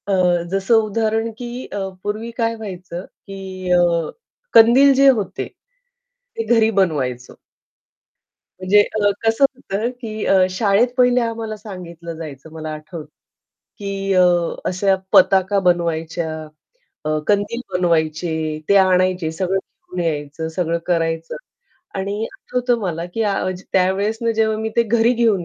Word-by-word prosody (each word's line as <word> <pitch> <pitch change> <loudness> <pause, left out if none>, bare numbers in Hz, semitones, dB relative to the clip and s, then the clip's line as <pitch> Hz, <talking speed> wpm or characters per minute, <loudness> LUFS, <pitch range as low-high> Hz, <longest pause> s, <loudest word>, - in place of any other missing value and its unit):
अ, 180 -3 +2
जसं 195 +3 +1
उदाहरण 225 +1 -1
की 245 +1 -6
अ, - - -7 0.3
पूर्वी 215 +3 -3
काय 230 -1 0
व्हायचं 185 -4 -7
की 190 -2 -8
अ, 175 -2 +3 0.4
कंदील 245 +5 +7
जे 275 +1 +5
होते, 215 -7 0 0.9
ते 225 - -2
घरी 225 -1 +4
बनवायचो. 130 -9 -2 1.2
म्हणजे 190 +3 +5 0.2
अ, 205 - +4 0.2
कसं 225 +5 +4
होतं 225 -3 -3
की 215 -2 -5
अ, 190 -1 +4
शाळेत 200 +4 +2
पहिले 250 0 +4
आम्हाला 225 -2 -3
सांगितलं 175 -5 -9
जायचं 155 -2 -9
मला 155 -1 -6
आठवतं 155 +1 -8 0.7
की 195 -1 -3
अ, 185 -1 +6 0.4
अशा 190 +2 +2 0.2
पताका 195 +1 +5
बनवायच्या, 165 -1 -1 0.7
अ, 155 0 0
कंदील 205 +3 +1
बनवायचे, 160 -2 0
ते 200 - +5
आणायचे 185 -3 +3
सगळं 185 +3 -1
घेऊन 180 -1 -9
यायचं, 150 +1 -3
सगळं 170 0 -1
करायचं 165 -2 -1 0.6
आणि 200 +3 -2
आठवतं 250 -1 -1
मला 170 -4 -3
की 225 - 0 0.5
त्यावेळेसनं 200 +5 +1
जेव्हा 220 -1 +1
मी 220 0 -2
ते 235 - +5
घरी 230 +1 +2
घेऊन 225 -7 +2
195 Hz, 125 wpm, -20 LUFS, 170-220 Hz, 1.2 s, कंदील